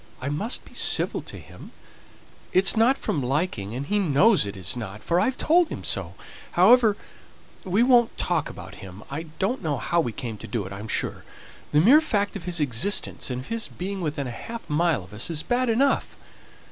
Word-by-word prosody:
I 135 - -3
must 205 - -3
be - - -17
civil - - 0
to - - -10
him; - - -13 0.8
it's 190 +4 +4
not 235 +5 +4
from 145 - -2
liking, 125 - -2
and 135 +3 -4
he 205 +7 0
knows 185 - +3
it's 95 0 -4
not, 110 -3 -7
for 170 +1 +1
I've 260 +3 0
told 340 +1 +3
him - - -6
so. - - -1 0.4
However, 215 +3 +5 0.7
we 190 +5 +2
won't 245 -2 +4
talk 170 -4 -1
about 95 +2 -10
him. 95 +2 -10
I 155 +4 -4
don't 235 +7 -1
know 150 -4 -1
how 170 +6 +1
we 120 - -3
came 115 -2 -6
to - - -8
do 115 -5 -3
it, 95 - -7
I'm 100 +3 -7
sure: - - -2 0.5
the 150 - +4
mere 265 - +7
fact 205 -10 -1
of 185 -4 -7
his 175 -2 0
existence, 150 - +1
and 125 0 -3
of 130 - -12
his 230 -1 0
being 190 +1 -5
within 150 -4 -2
half 225 - -7
a - - -4
mile 165 - +2
of 95 +3 -15
us, 105 +9 0
is 160 -2 -1
bad 250 0 0
enough. 270 +5 +1
170 Hz, 200 wpm, -25 LUFS, -, 0.8 s, mere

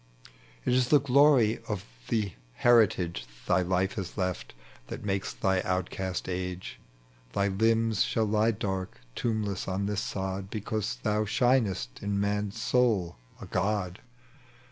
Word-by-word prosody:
It - - +2
is 125 -1 +3
the 145 +2 +6
glory 135 -4 +4
of 105 -3 -3 0.2
the 105 -5 0 0.2
heritage 110 - +3 0.2
Thy 90 +1 +3
life 95 +2 +1
has 95 -3 -5
left, 90 - -3 0.3
that - - -7
makes 95 -1 -1
thy 95 -1 +1
outcast 95 0 -2
age; 90 0 -4 0.5
Thy 100 0 +1
limbs 110 +1 +2
shall 110 -1 +2
He 115 - +4
dark, 95 - -4 0.2
tombless 105 -5 -1
on 95 +1 -1
this 105 0 -1
sod, 95 -1 -3
Because 105 - -2
thou 105 0 +1
shinest 110 - +1
in 100 0 -1
man's 105 0 -1
soul, 110 - +2 0.2
a - - -8
god. 100 -3 -1
100 Hz, 135 wpm, -29 LUFS, 95-110 Hz, 0.5 s, the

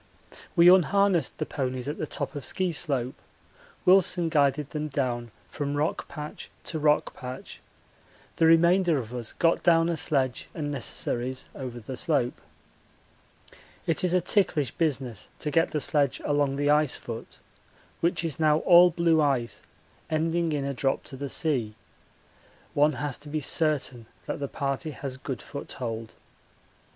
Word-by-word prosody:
We 170 -1 +7
unharnessed 185 -2 +4
the - - -2
ponies 130 -2 -3
at 145 - -4
the 155 - -2
top - - -4
of 145 - -6
Ski 185 +5 0
slope 135 -5 -1 0.6
Wilson 180 -2 +4
guided 145 -2 +1
them 155 0 -3
down 125 -4 -2 0.2
from 145 0 -3
rock 150 +2 -1
patch 150 0 -8
to 160 - -4
rock 150 0 +2
patch; 130 0 -8 0.8
the 165 - +4
remainder 170 0 +5
of 120 -2 -5
us 120 -3 -3
got 165 0 +2
down 165 -1 +4
a 170 - 0
sledge 135 -5 -1
and 145 -3 -3
necessaries 130 -1 -2
over 125 -3 -6
the 125 +4 -7
slope. 125 -3 0 1.4
It 165 - 0
is 180 0 +2
a 180 - +3
ticklish 170 - +1
business 135 - -2
to 150 - -3
get 165 +3 +3
the 150 - -1
sledge 145 -1 +1
along 145 -2 +1
the 145 +1 +2
ice 150 -2 +3
foot, 115 -1 -8 0.6
which 170 +1 +1
is 160 -3 -3
now 155 -1 +4
all 180 0 +7
blue 165 -2 +2
ice 120 -7 0 0.5
ending 165 +1 0
in 145 -2 -1
a 140 - -2
drop 135 +1 0
to 135 - -9
the 140 +1 -5
sea. 125 -11 0 1.0
One 150 +1 +3
has 140 0 -3
to 145 - -11
be 155 +1 -1
certain 140 -6 0 0.2
that - - -4
the 140 - -2
party 140 +2 -3
has 135 -2 -6
good 130 -2 -6
foothold. 115 -5 -6
145 Hz, 155 wpm, -27 LUFS, 130-165 Hz, 1.4 s, We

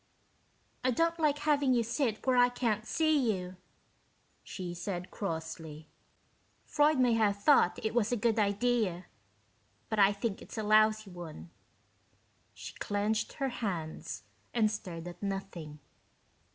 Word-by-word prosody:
"I 255 - +3
don't 330 +6 +1
LIKE 300 -2 +2
having 290 -3 +2
you 235 - +2
sit 230 -1 -1
where 260 -1 +3
I 245 0 +6
can't 230 -3 -1
see 310 -7 +2
you," 180 -2 -5 0.9
she 180 -2 -6
said 175 0 -5
crossly. 160 -4 -5 0.8
"Freud 300 0 +3
may 250 -2 +4
have 210 -3 +2
thought 200 -5 +4
it 220 - 0
was 230 -2 +1
a 245 - +1
good 225 +1 +1
idea, 205 -3 +1 0.8
but 220 - -1
I 195 0 +7
think 200 0 -3
it's - - -10
a 220 - -1
lousy 215 -1 +3
one." 160 - -9 1.0
She - - -8
clenched 210 +2 -1
her 270 -1 -2
hands 185 -10 -4 0.3
and 215 -3 +3
stared 175 -5 -6
at 175 - -9
nothing. 195 -6 -5
215 Hz, 140 wpm, -31 LUFS, 180-245 Hz, 1.0 s, I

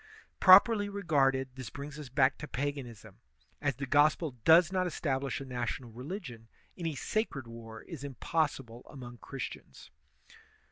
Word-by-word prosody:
Properly 205 +2 +7
regarded, 140 -9 +1
this 130 -2 -7
brings 145 +1 -8
us 145 -4 -8
back 130 0 +2
to 150 - -6
paganism; 125 -8 -5 0.4
as 145 -3 0
the 140 - -4
Grospel 150 +3 +3
does 165 +2 +6
not 185 -1 +1
establish 140 -5 -2
a 135 - -7
national 125 -1 -4
religion, 125 - -8 0.3
any 165 -4 -3
sacred 145 - -2
war 115 -1 -10
is 155 -5 -9
impossible 135 -3 -2
among 120 -3 -10
Christians. 135 - -8
140 Hz, 135 wpm, -31 LUFS, 125-160 Hz, 0.4 s, Properly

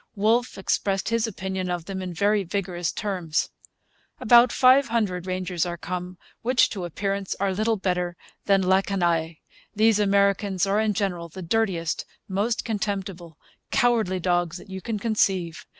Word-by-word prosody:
Wolfe 225 +4 +1
expressed 195 +1 -1
his 230 0 +1
opinion 190 -3 -4
of 175 -2 -3
them 190 0 -5
in 185 -1 -5
very 205 +4 +1
vigorous 175 -2 -2
terms: 180 -7 -2 0.7
'About 240 0 +6
500 230 -9 +3
Rangers 185 -2 -1
are 175 -1 -3
come, 180 +1 -5 0.2
which, 245 +1 +3
to 190 -4 -4
appearance, 195 +3 -3
are 195 -1 +1
little 215 +3 +1
better 180 -2 -2 0.3
than 195 -1 +3
la 190 +1 +4
canaille. 170 -4 0 0.4
These 215 0 +4
Americans 200 -1 +2
are 200 +2 +1
in 215 -2 +1
general 180 -4 -2
the 185 +3 -8
dirtiest, 175 -4 0 0.2
most 205 +4 -1
contemptible, 195 -6 -4 0.3
cowardly 225 -7 +2
dogs 175 -1 0
that 190 - -13
you 190 0 -6
can 225 0 -3
conceive. 195 -6 0
195 Hz, 150 wpm, -25 LUFS, 180-215 Hz, 0.7 s, About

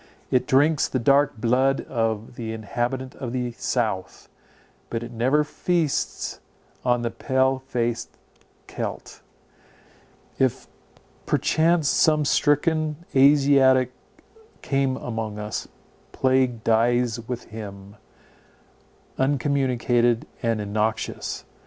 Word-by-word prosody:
It 125 - +2
drinks 150 +2 +3
the - - -2
dark 140 +2 +3
blood 130 +4 +2
of 115 -2 -2
the 110 -2 -5
inhabitant 120 +4 -3
of 125 -2 -5
the 125 -1 -2
south, 110 -5 -3 0.6
but 115 0 -3
it 120 - -8
never 130 +6 +2
feasts 165 0 -1 0.4
on 120 -1 +1
the 115 - -1
pale 130 0 +1
faced 120 -2 -2 0.6
Celt. - - -6 1.2
If 130 -2 +1 0.6
perchance 160 0 +2
some 155 0 +3
stricken 155 +2 +1
Asiatic 135 -2 +5 0.7
come 135 -1 0
among 110 -3 -4
us, 105 0 -4 0.5
plague 130 -3 +1
dies 120 +1 +2
with 125 -1 -4
him, 100 -2 -9 1.2
uncommunicated 125 -3 +1 0.2
and 115 -2 0
innoxious. 110 +2 -2
125 Hz, 95 wpm, -24 LUFS, 115-140 Hz, 1.2 s, Asiatic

